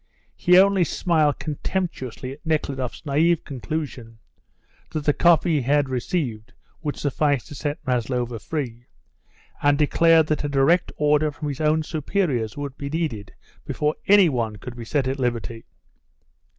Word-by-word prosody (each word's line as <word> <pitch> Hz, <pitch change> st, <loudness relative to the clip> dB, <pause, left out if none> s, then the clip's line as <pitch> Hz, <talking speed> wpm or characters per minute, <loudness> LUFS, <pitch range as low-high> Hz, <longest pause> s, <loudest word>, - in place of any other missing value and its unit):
He 180 Hz, +1 st, +4 dB
only 195 Hz, -1 st, +5 dB
smiled 160 Hz, -4 st, +1 dB
contemptuously 145 Hz, -5 st, -4 dB
at 140 Hz, +3 st, -12 dB
Nekhludoff's 140 Hz, -4 st, -2 dB
naive 155 Hz, +4 st, +2 dB
conclusion, 135 Hz, -5 st, -5 dB, 0.7 s
that 155 Hz, -2 st, -4 dB
the 145 Hz, -, +4 dB
copy 170 Hz, 0 st, +4 dB
he -, -, 0 dB
had 140 Hz, +2 st, +2 dB
received 125 Hz, -4 st, -3 dB, 0.3 s
would 150 Hz, -3 st, -3 dB
suffice 145 Hz, -2 st, 0 dB
to 160 Hz, -, -11 dB
set 145 Hz, +2 st, -3 dB
Maslova 125 Hz, -1 st, -1 dB
free, 120 Hz, -, -5 dB, 0.7 s
and 145 Hz, 0 st, +3 dB
declared 160 Hz, +2 st, +4 dB
that 155 Hz, -1 st, -1 dB
a 145 Hz, -, -1 dB
direct 145 Hz, +6 st, +3 dB
order 150 Hz, +1 st, +3 dB
from 150 Hz, 0 st, -5 dB
his 140 Hz, +1 st, -5 dB
own 155 Hz, +1 st, +2 dB
superiors 150 Hz, -, -1 dB
would 140 Hz, -2 st, -5 dB
be 140 Hz, -, -4 dB
needed 140 Hz, -11 st, -3 dB, 0.3 s
before 150 Hz, 0 st, -1 dB
any 200 Hz, -2 st, +7 dB
one 115 Hz, -7 st, -1 dB
could 120 Hz, +4 st, -9 dB
be 120 Hz, -1 st, -8 dB
set 135 Hz, +2 st, 0 dB
at 135 Hz, +1 st, -2 dB
liberty. 115 Hz, -2 st, -3 dB
145 Hz, 150 wpm, -23 LUFS, 125-160 Hz, 0.7 s, any